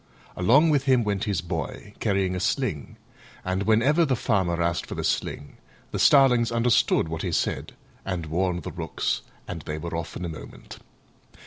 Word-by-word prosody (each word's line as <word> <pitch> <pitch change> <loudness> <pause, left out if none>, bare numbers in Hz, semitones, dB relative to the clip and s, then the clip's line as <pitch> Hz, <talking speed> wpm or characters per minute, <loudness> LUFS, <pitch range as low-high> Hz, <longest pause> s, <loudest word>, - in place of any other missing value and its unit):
Along 135 - +4
with 140 -2 +2
him 130 -3 +4
went 105 0 -1
his 100 -6 -1
Boy, 85 +4 -5
carrying 95 -3 0
a - - -2
sling: 95 - -2 0.5
and 95 +1 -1
whenever 115 +11 +3
the 135 -5 +1
Farmer 95 -6 0
asked 85 -1 0
for - - -6
the - - -3
sling 75 - -2 0.3
the - - -3
starlings 125 -5 +5
understood 115 -7 +2
what 80 0 -4
he 90 - -2
said - - -1 0.3
and 90 -4 -3
warned 90 +2 -1
the - - -5
Rooks - - -2 0.3
and 85 - -5
they 75 +1 -5
were 85 +1 -5
off 85 0 -5
in 90 - -4
a - - -2
moment. 80 -2 -10
95 Hz, 180 wpm, -25 LUFS, 85-120 Hz, 0.5 s, starlings